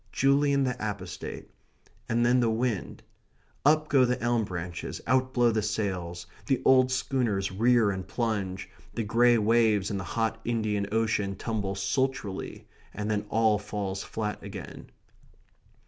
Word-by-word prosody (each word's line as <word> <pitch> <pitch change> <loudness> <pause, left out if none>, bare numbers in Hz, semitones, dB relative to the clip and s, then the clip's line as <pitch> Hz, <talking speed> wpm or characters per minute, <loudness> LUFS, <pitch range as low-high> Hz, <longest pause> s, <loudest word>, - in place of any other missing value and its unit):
"Julian 140 0 +3
the 125 -2 0
Apostate" 100 -4 -6 0.6
and 120 +1 +2
then 125 +1 +4
the 120 -2 +2
wind. 110 -3 -2 0.6
Up 155 +2 +4
go 135 -3 +4
the 125 0 +1
elm 120 -2 +1
branches, 90 -2 -5
out 130 +1 +2
blow 120 -2 +3
the 110 -1 0
sails, 90 -5 -3 0.2
the 135 -3 +2
old 130 -1 +5
schooners 120 -7 0
rear 115 +1 +3
and 95 -1 -5
plunge, 105 -4 -2 0.3
the 115 - -1
grey 120 +3 +4
waves 110 -2 +3
in 100 - -2
the - - -4
hot 115 +4 -2
Indian 110 -4 -1
Ocean 110 -3 0
tumble 100 -2 -3
sultrily, 100 +1 -2 0.3
and 105 +1 -2
then 105 0 -1
all 110 -2 +3
falls 100 -2 -4
flat 105 -1 -4
again. 95 -7 -9
110 Hz, 145 wpm, -28 LUFS, 100-120 Hz, 0.6 s, old